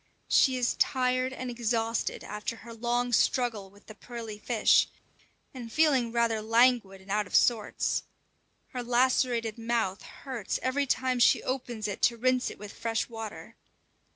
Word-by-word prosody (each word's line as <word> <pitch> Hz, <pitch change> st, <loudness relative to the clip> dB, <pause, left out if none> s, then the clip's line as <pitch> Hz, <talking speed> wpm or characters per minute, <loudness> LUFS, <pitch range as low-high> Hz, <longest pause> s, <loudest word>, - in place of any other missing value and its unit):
She 260 Hz, -2 st, +4 dB
is 245 Hz, -1 st, +1 dB
tired 255 Hz, 0 st, +1 dB
and 255 Hz, -1 st, -5 dB
exhausted 230 Hz, -1 st, -1 dB
after 210 Hz, +2 st, -5 dB
her 230 Hz, +1 st, -11 dB
long 240 Hz, +1 st, -1 dB
struggle 230 Hz, -6 st, +1 dB
with 200 Hz, +1 st, -21 dB
the 215 Hz, -, -11 dB
pearly 225 Hz, -1 st, -8 dB
fish, 225 Hz, 0 st, +3 dB, 0.7 s
and 240 Hz, -4 st, -8 dB
feeling 270 Hz, -6 st, +3 dB
rather 230 Hz, -2 st, +1 dB
languid 225 Hz, -3 st, +3 dB
and 195 Hz, +1 st, -10 dB
out 210 Hz, 0 st, 0 dB
of -, -, -4 dB
sorts. 225 Hz, -4 st, +2 dB, 0.7 s
Her 250 Hz, -, -5 dB
lacerated 240 Hz, -2 st, +1 dB
mouth 225 Hz, -4 st, -1 dB
hurts 255 Hz, -7 st, -5 dB
every 275 Hz, +2 st, 0 dB
time 255 Hz, -1 st, 0 dB
she 240 Hz, -, +4 dB
opens 245 Hz, -4 st, -3 dB
it 205 Hz, -, -5 dB
to 235 Hz, -, +3 dB
rinse 255 Hz, +1 st, +1 dB
it -, -, -10 dB
with 205 Hz, 0 st, -9 dB
fresh 225 Hz, +1 st, -2 dB
water. 225 Hz, -2 st, -8 dB
235 Hz, 155 wpm, -28 LUFS, 220-250 Hz, 0.7 s, She